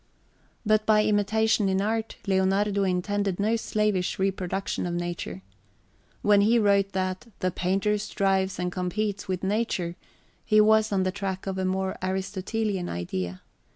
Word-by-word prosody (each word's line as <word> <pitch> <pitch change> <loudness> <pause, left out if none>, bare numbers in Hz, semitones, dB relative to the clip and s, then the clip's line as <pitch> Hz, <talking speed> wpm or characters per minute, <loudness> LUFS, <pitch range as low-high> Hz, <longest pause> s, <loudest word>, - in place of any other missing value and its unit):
But 215 0 +3
by 215 -1 +5
imitation 210 0 +2
in 190 0 +1
art, 220 +2 -1
Leonardo 195 +1 +2
intended 195 +1 -1
no 215 +3 +2
slavish 210 -4 0
reproduction 190 -1 -2
of 175 - -2
nature. 175 - -4 0.8
When 205 -1 +5
he 225 +4 +4
wrote 200 -3 +3
that 185 +3 -2
"the 185 - -1
painter 195 +4 0
strives 195 -2 0
and 180 0 -2
competes 200 +3 -2
with 185 -1 -3
nature," 190 -4 -1 0.5
he 215 - +4
was 220 0 +4
on 190 -2 +2
the 185 - 0
track 190 -1 -4
of 190 -1 -3
a 190 - 0
more 190 0 -1
Aristotelian 190 +1 -2
idea. 90 +1 -4
195 Hz, 145 wpm, -26 LUFS, 185-210 Hz, 0.8 s, by